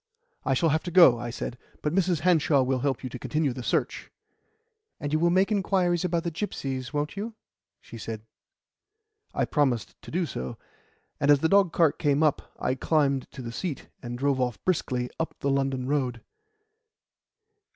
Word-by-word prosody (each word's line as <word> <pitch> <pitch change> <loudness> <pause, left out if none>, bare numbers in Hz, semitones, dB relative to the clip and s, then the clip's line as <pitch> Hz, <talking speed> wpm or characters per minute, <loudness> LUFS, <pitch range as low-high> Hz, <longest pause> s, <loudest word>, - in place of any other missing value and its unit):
"I - - +1
shall 165 - +3
have 155 +2 +2
to - - -2
go," 170 -9 +7
I 120 - -4
said, 120 0 -5 0.2
"but 150 - 0
Mrs. 180 -4 +2
Hanshaw 155 -5 +4
will 130 0 0
help 135 -1 -1
you 130 - -3
to 125 - -6
continue 150 -2 0
the 125 - -6
search." - - -1 0.9
"And 145 0 -3
you 155 - +3
will 170 +1 +3
make 190 +4 +3
inquiries 185 -4 +1
about 170 -2 0
the 170 - -2
gipsies, 135 - -4
won't 150 +3 -2
you?" 215 +3 -5 0.4
she 115 - -11
said. 110 -1 -6 1.1
I - - +2
promised 130 -7 0
to - - -11
do 175 +2 0
so, 65 - -5 0.6
and 140 - +1
as 145 -1 +6
the 160 - +2
dogcart 175 -6 +4
now - - -12
came 145 +1 +3
up, 150 -3 +1
I 130 - 0
climbed 140 -1 +1
to 130 - -9
the 115 - -5
seat, 150 +4 -5
and 120 0 -5
drove 135 0 +1
off 125 -3 0
briskly 130 -9 0
up 160 - -2
the 140 - 0
London 135 -2 0
Road. 130 -4 -1
145 Hz, 185 wpm, -27 LUFS, 130-170 Hz, 1.1 s, go